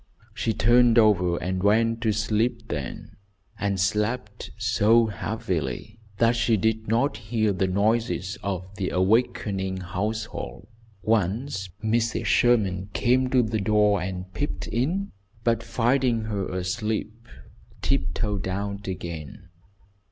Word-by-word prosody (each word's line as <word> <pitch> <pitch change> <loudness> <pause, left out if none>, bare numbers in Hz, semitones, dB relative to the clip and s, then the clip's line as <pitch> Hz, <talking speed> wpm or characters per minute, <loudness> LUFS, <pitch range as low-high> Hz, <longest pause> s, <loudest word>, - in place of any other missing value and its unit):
She 115 - -1
turned 120 +2 +4
over 90 -6 +4
and 95 +1 -2
went 115 +3 +2
to 110 -2 +2
sleep 110 +2 0
then, 70 -3 -5 0.4
and 100 -2 0
slept 105 +3 -1
so 115 +1 +4
heavily 95 - -3 0.2
that 115 +2 +3
she 115 -1 +2
did 110 +2 0
not 120 +6 +1
hear 110 -1 0
the 95 0 0
noises 105 0 0
of 95 -2 -3
the 95 -3 -1
awakening 95 -1 +1
household. 95 - -4 0.3
Once 105 -1 0
Mrs. 115 +1 0
Sherman 100 -6 +2
came 130 +1 +2
to 125 -1 +4
the 110 -1 -1
door 105 -1 +3
and 90 0 -5
peeped 90 - -3
in, 170 - -1 0.3
but, 115 -1 +2
finding 120 +1 +1
her 100 -4 -3
asleep, 105 +4 -3 0.6
tiptoed 100 -3 -1
out 100 +1 -4
again. 85 -1 -6
105 Hz, 120 wpm, -25 LUFS, 95-115 Hz, 0.6 s, turned